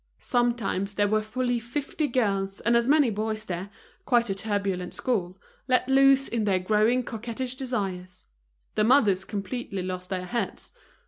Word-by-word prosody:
Sometimes 215 - 0
there 205 0 +2
were 215 +1 +2
fully 245 +2 -1
fifty 285 +6 -3
girls 195 -6 0
and 235 +1 +2
as 235 0 +3
many 290 -4 +4
boys 215 +1 -3
there, 185 +1 -4 0.3
quite 235 -4 +2
a - - +1
turbulent 195 -3 -2
school, 190 -7 -2 0.3
let 255 -1 +2
loose 270 0 +5
in 230 -2 -1
their 195 -2 +3
growing 215 +6 +2
coquettish 240 +2 -4
desires. 195 -9 -4 0.5
The 215 - +2
mothers 210 -6 +4
completely 200 -1 -4
lost 185 0 -5
their 185 -2 -3
heads. 235 +5 -4
215 Hz, 150 wpm, -26 LUFS, 195-245 Hz, 0.5 s, loose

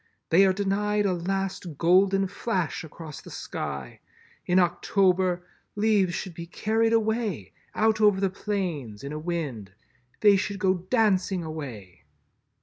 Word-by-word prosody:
They 190 +4 +6
are - - +4
denied 205 +2 0
a 190 - +2
last 185 -2 -3
golden 190 +4 +4
flash 185 -4 -2
across 160 -1 -9
the - - -12
sky. 70 -2 -6 0.5
In 180 - +3
October, 180 0 +2 0.3
leaves 205 -4 +2
should 185 - -5
be 170 +1 -8
carried 220 +5 +1
away, 220 - 0 0.2
out 220 0 +2
over 205 -2 +5
the 195 -1 +1
plains, 170 - -4
in 140 +2 -5
a 155 - -4
wind. 145 - -4 0.5
They 205 -2 +6
should 200 +1 -2
go 190 -2 +2
dancing 190 -1 +1
away." 120 - -8
185 Hz, 140 wpm, -26 LUFS, 165-205 Hz, 0.5 s, They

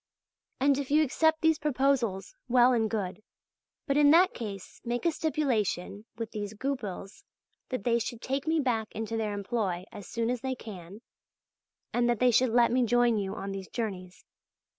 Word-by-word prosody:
And 275 +1 +3
if 275 - -4
you 305 +2 +4
accept 315 +3 +2
these 320 -1 +3
proposals, 265 -9 0
well 250 0 +5
and 225 -2 +1
good; 205 -2 -3 0.6
but 280 -2 +1
in 295 -1 +6
that 355 +5 +6
case 200 -5 -7
make 240 +5 -3
a 335 - +4
stipulation 235 - -1
with 230 -1 -5
these 210 -1 -5
Goupils 210 -6 -5 0.5
that 255 -6 -3
they 235 0 +2
should 230 +1 -4
take 270 +4 -3
me 320 0 +2
back 235 -6 0
into 225 +1 -3
their 215 -2 -1
employ 200 -4 -2
as 205 - -9
soon 230 0 -1
as 250 -2 -3
they 260 +1 -2
can, 200 -3 -10 0.9
and 240 0 +2
that 240 - +2
they 250 +2 +4
should 250 +2 +4
let 235 +1 +4
me 250 +1 +3
join 240 -1 +3
you 195 0 -3
on 195 -1 -5
these 195 -1 -6
journeys. 185 -6 -5
235 Hz, 180 wpm, -29 LUFS, 210-265 Hz, 0.9 s, in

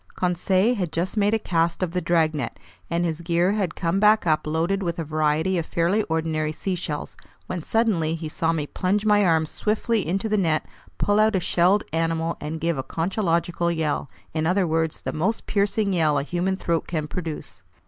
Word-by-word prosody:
Conseil 185 +5 +2
had 185 -8 -2
just 175 +5 -2
made 210 +1 +3
a - - +3
cast 170 -3 0
of 175 - -1
the 180 +1 -1
dragnet, 160 -6 0 0.3
and 170 +1 0
his 165 -1 -2
gear 170 +2 +2
had 200 -5 -1
come 175 +2 0
back 215 0 +5
up 155 -2 +1
loaded 165 +6 0
with 170 -2 -2
a 165 - -2
variety 155 +4 +1
of 165 - -3
fairly 175 +6 +1
ordinary 160 -1 0
seashells, 170 -2 -4 0.3
when 180 -2 -4
suddenly 175 -6 +1
he 160 -1 -5
saw 165 +2 0
me 155 -3 -1
plunge 195 +7 -1
my 210 -1 +4
arms 160 -4 +2
swiftly 215 -2 0
into 195 +5 -1
the 215 -1 +1
net, 160 -4 +1 0.3
pull 205 +1 +2
out 215 -1 +4
a - - +3
shelled 180 +3 +3
animal, 165 0 0
and 160 +2 -4
give 165 -3 0
a - - -2
conchological 170 0 0
yell, 160 -4 -1 0.2
in 160 0 0
other 185 +2 +2
words, 160 -1 0
the - - -4
most 190 +9 -1
piercing 200 0 +1
yell 155 -4 +2
a 140 - 0
human 175 +5 -1
throat 170 -3 -1
can 155 -3 -2
produce. 155 - -6
170 Hz, 195 wpm, -24 LUFS, 160-195 Hz, 0.3 s, back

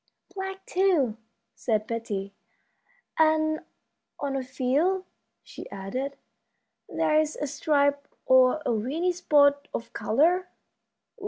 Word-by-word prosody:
"Black, 385 0 -6
too," 340 - +2 0.4
said 215 -3 -1
Betty; 205 -4 -4 0.9
"and 315 0 +3 0.6
on 280 -1 -2
a 270 - -1
few," 290 +9 0 0.4
she - - -10
added, 255 +9 -5 0.7
"there's 310 0 +1
a 295 - -3
stripe 285 0 +1 0.2
or 260 +4 +5
a - - +1
weeny 285 +12 0
spot 285 -5 +3
of 230 0 -6
color." 345 +10 +2
285 Hz, 100 wpm, -26 LUFS, 250-315 Hz, 0.9 s, or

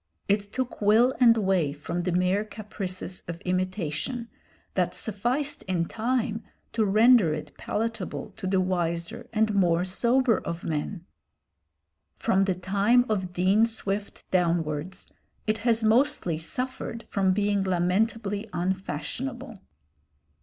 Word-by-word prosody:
It 205 0 0
took 255 -2 -3
will 225 +5 +5
and 235 -2 +6
way 190 -8 +1
from 160 +4 -4
the 180 +1 -1
mere 180 +3 +2
caprices 195 -4 -5
of 170 0 -5
imitation, 185 - -2 0.4
that - - 0
sufficed 250 +8 -1
in 175 -3 0
time 225 +1 -1 0.3
to 220 -2 +2
render 215 -4 +5
it 150 - -8
palatable 220 -1 -3
to 190 - -4
the 190 0 +2
wiser 175 +4 -2
and 220 -1 +2
more 175 -3 +3
sober 235 +5 +2
of 170 0 -5
men. 165 +3 -3 1.1
From 195 -4 +2
the 190 -2 0
time 200 +7 +3
of 190 -4 -1
Dean 190 +5 +3
Swift 205 -2 -4
downwards, 170 0 0 0.4
it 215 0 0
has 230 0 +2
mostly 220 - +2
suffered 240 +5 -4
from 195 -2 +2
being 205 0 +1
lamentably 200 +4 0
unfashionable. 195 - -3
200 Hz, 125 wpm, -27 LUFS, 180-225 Hz, 1.1 s, and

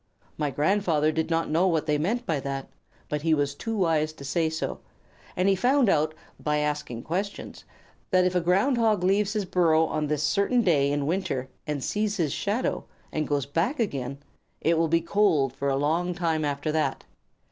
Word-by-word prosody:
My 150 -2 -1
grandfather 155 0 +1
did 160 +1 -1
not 165 -1 0
know 170 +4 +3
what 165 -4 +1
they 150 -1 +1
meant 230 +10 -1
by 155 -4 0
that, 135 0 -4 0.4
but 150 0 -2
he 160 0 +3
was 145 -1 0
too 225 +9 -4
wise 160 -4 +1
to 140 -3 -11
say 160 +3 +1
so, 160 0 -4 0.6
and 180 +1 +1
he 195 - +4
found 250 +3 +3
out 155 -2 +2 0.2
by 150 0 0
asking 150 -6 -2
questions, 195 +5 -4 0.4
that 185 -1 +4
if 180 - +1
a 180 - +2
Ground 195 +10 +2
Hog 215 -5 +2
leaves 200 +2 +2
his 210 -3 -1
burrow 165 -3 +3
on 155 -1 -2
this 150 0 -1
certain 200 +10 +2
day 140 -7 +3
in 145 -1 0
winter, 160 -6 -2 0.2
and 145 -3 -2
sees 210 0 -1
his 155 -6 0
shadow, 215 +6 -1 0.3
and 155 -1 -2
goes 145 -3 0
back 165 - -1
again, 140 - -2 0.4
it 165 - +2
will 165 0 +2
be 165 +1 +2
cold 170 -7 +2
for 140 +1 -2
a 135 - +1
long 165 +6 0
time 165 -3 0
after 145 +1 -1
that. 150 -3 -1
160 Hz, 195 wpm, -26 LUFS, 150-190 Hz, 0.6 s, he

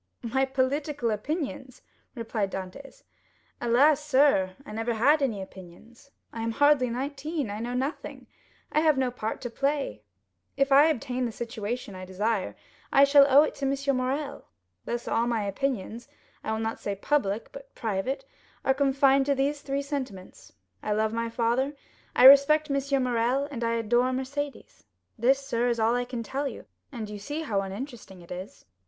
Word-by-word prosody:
"My 265 +3 +1
political 270 -1 -1
opinions!" 265 - -4 0.3
replied 225 -4 -2
Dantès. 190 +9 -8 0.6
"Alas, 275 +6 +4
sir, 265 -10 +3
I - - -9
never 225 +2 -2
had 285 +7 +4
any 220 -8 -1
opinions. 190 +8 -14 0.2
I 230 - -5
am 225 0 -2
hardly 285 -1 +4
nineteen; 275 +1 -3
I 205 - -5
know 240 +2 -3
nothing; 270 +5 -4 0.5
I - - +3
have 310 -3 +3
no 260 -2 +1
part 220 -3 -4
to 245 - -4
play. 275 - -1 0.6
If 275 0 +2
I 285 +3 +7
obtain 255 -4 -1
the 235 - -2
situation 230 -1 -5
I 185 0 -8
desire, 200 +2 -2 0.4
I 275 - +6
shall 280 0 +7
owe 280 +2 +7
it 310 - -2
to 275 - -3
M. 275 0 0
Morrel. 275 +3 -2 0.4
Thus 240 0 -4
all 230 +1 +1
my 230 -3 0
opinions—I 225 0 -5
will 220 - -1
not 225 0 -3
say 200 - -3
public, 210 -2 -1
but 275 0 -12
private—are 265 +5 -3
confined 275 0 +3
to 280 - +3
these 285 +2 0
three 280 0 -2
sentiments,—I 255 -6 -6
love 215 +1 0
my 230 0 -2
father, 240 +5 0 0.4
I - - +4
respect 280 +3 +8
M. 275 -1 +1
Morrel, 250 +3 +1
and 240 -4 -4
I 230 0 +1
adore 240 +3 +2
Mercédès. 270 +2 -5 0.3
This, 260 +4 +4
sir, 245 -3 -1
is 235 -1 0
all 225 +1 +3
I 245 0 0
can 245 -2 -5
tell 275 +5 -3
you, - - -8 0.3
and 230 -5 -5
you 210 0 -7
see 290 +10 -4
how 205 -10 0
uninteresting 200 -1 -8
it 170 - -16
is." 185 +2 -8
255 Hz, 165 wpm, -27 LUFS, 225-275 Hz, 0.6 s, respect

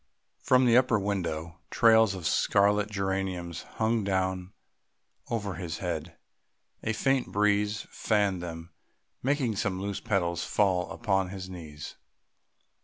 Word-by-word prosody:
From 130 0 +4
the 120 -1 +5
upper 125 -3 +4
window 85 -4 -3
trails 110 -3 +5
of 90 -3 -7
scarlet 105 +1 +3
geraniums 95 -4 -2 0.2
hung 110 0 +1
down 95 -1 -1 0.8
over 105 -4 -2
his 85 -2 -5
head; 85 -2 -4 0.6
a 110 - -1
faint 135 +3 0
breeze 105 +1 +1
fanned 100 -4 +1
them, 85 0 -7 0.5
making 130 -5 0
some 95 -2 -1
loose 100 0 -3
petals 85 -4 0
fall 95 -4 +1
upon 95 -5 0
his 95 -1 -7
knees. 75 -4 -9
95 Hz, 120 wpm, -28 LUFS, 90-105 Hz, 0.8 s, the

